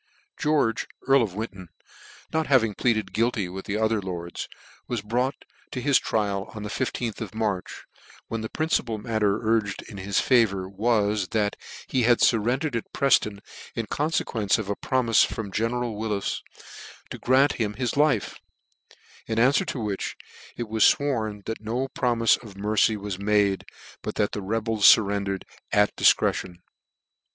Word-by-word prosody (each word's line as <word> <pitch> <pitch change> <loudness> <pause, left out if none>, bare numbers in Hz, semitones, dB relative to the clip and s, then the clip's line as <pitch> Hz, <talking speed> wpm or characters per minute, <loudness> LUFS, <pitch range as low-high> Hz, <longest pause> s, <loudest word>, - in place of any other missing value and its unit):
George 145 -7 +1 0.2
earl 135 0 +6
of 100 -6 -2
Winton, 100 -5 -6 0.6
not 160 -1 0
having 115 -6 +3
pleaded 110 -4 0
guilty 110 -3 +1
with 95 +2 -7
the 100 - -2
other 110 -1 +1
lords, 85 -2 -5 0.4
was 120 -4 -3
brought 125 +5 -1 0.2
to 130 - -4
his 140 +1 +3
trial 100 -3 -1
on 105 - -6
the 105 - -5
I5th 120 -1 -3
of 110 -1 -6
March, 105 -5 -2 0.4
when 115 -1 -3
the 110 - -4
principal 140 -8 0
matter 105 -1 0
urged 110 -3 +1
in 100 - -11
his 100 +1 0
favour 105 -7 +2
was, 105 -1 +1
that 105 -2 0 0.3
he 130 - +1
had 120 0 +4
fur 115 - +5
rendered 130 +5 -1
at 115 - -4
Prefton 105 -7 +2 0.3
in 115 - -2
confequence 115 - 0
of 110 -3 -5
a 100 - 0
promife 120 -3 +3
from 105 -1 -3
general 115 +2 -1
Wills 105 -2 -2 0.7
to - - -6
grant 135 +3 +4
him 105 -1 -1
his 120 0 -2
life: 150 -1 +1 0.9
in 110 - -2
an 125 +4 +5
fwer - - +1
to - - -3
which 105 -4 -3 0.4
it 120 - -3
was 110 0 +1
fworn, 110 -8 -2
that 115 - -4
no 120 +5 -2
promife 115 -3 +2
of 105 -5 -12
mercy 105 +1 +2
was 100 -2 -5
made, 100 -1 +2 0.4
but - - -5
that 105 - +1
the 105 - -4
rebels 110 +1 +4
furrendered 100 -2 +1 0.3
at 105 0 +3
difcretion. 90 - +2
110 Hz, 160 wpm, -25 LUFS, 100-120 Hz, 0.9 s, earl